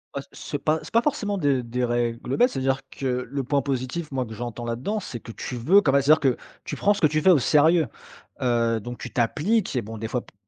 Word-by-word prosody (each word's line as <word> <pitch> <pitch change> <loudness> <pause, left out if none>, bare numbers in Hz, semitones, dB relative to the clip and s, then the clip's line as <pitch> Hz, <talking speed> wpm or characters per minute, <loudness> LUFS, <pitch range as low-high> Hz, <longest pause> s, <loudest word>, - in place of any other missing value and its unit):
Ouais, 140 - -2
ce 145 - -5
pas 155 +3 +1
c'est - - -12
pas 230 - +5
forcément 205 -7 -1
des 140 -7 +1
des 120 +2 -3
règles 120 +1 -1
bêtes. 245 +1 +5
C'est-à-dire 135 - 0
que 125 -2 -3
le 140 0 -2
point 140 +2 +1
positif, 135 +4 -3
moi, 130 -2 -1
que 110 - -9
j'entends 120 +1 -6
là-dedans, 125 - -2
c'est 130 - -7
que 115 - -10
tu 125 - -6
veux 165 - +5
quand 145 - +2
même. 140 +1 +4
C'est-à-dire 150 +3 +5
que 135 -4 +2 0.3
tu - - -5
prends 205 - +3
ce 200 - -6
que 155 - +6
tu 155 +1 0
fais 190 - +4
au 175 -6 +7
sérieux, 155 +4 +4 0.6
heu, 115 -2 +1
donc 120 +3 -7
tu - - -7
t'appliques 155 - +1
et 125 - +1
bon, 110 +1 -8
des 110 +1 -4
fois 125 +1 -2
p - - -21
135 Hz, 250 wpm, -24 LUFS, 120-155 Hz, 0.6 s, au